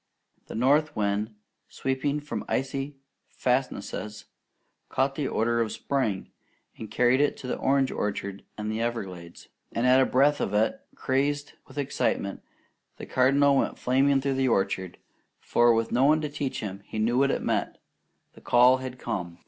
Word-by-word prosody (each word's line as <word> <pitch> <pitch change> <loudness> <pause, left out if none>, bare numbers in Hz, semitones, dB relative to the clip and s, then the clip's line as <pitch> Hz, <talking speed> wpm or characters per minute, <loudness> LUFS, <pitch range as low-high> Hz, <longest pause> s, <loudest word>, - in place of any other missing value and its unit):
The - - -8
north 145 +6 +2
wind, 105 +1 -1 0.3
sweeping 135 +2 -2
from 150 - -5
icy 135 +2 -2 0.3
fastnesses, 125 -4 -2 0.6
caught 135 +1 +1
this 140 -1 -2
odour 115 +1 +1
of 115 -2 0
spring, 120 -9 -2 0.4
and 110 - -8
carried 125 +4 +3
it 145 - +1
to - - -10
the 125 - -2
orange 135 0 +2
orchards 100 -1 -3 0.2
and 105 0 -3
Everglades; 95 -7 -5 0.2
and 115 - -1
at 130 +1 +6
a 130 - +3
breath 145 +3 +3
of 100 - -1
it, 110 +2 +1
crazed 145 +2 -1
with - - -15
excitement, 130 -7 -1 0.6
the - - -7
Cardinal 140 +2 +3
went - - 0
flaming 135 +2 +2
through 140 0 0
the 135 0 +1
orchard, 95 -5 0 0.4
for 120 0 +3
with 115 0 +1
no 130 +2 +3
one 155 +2 +5
to 150 - -3
teach 140 -2 -3
him, 100 -2 -6
he - - -7
knew 115 +4 +2
what 140 0 +3
it - - -1
meant. - - -1 0.6
The - - -16
call 125 +2 +5
had 130 -1 -7
come. 90 -9 -4
125 Hz, 165 wpm, -27 LUFS, 110-135 Hz, 0.6 s, at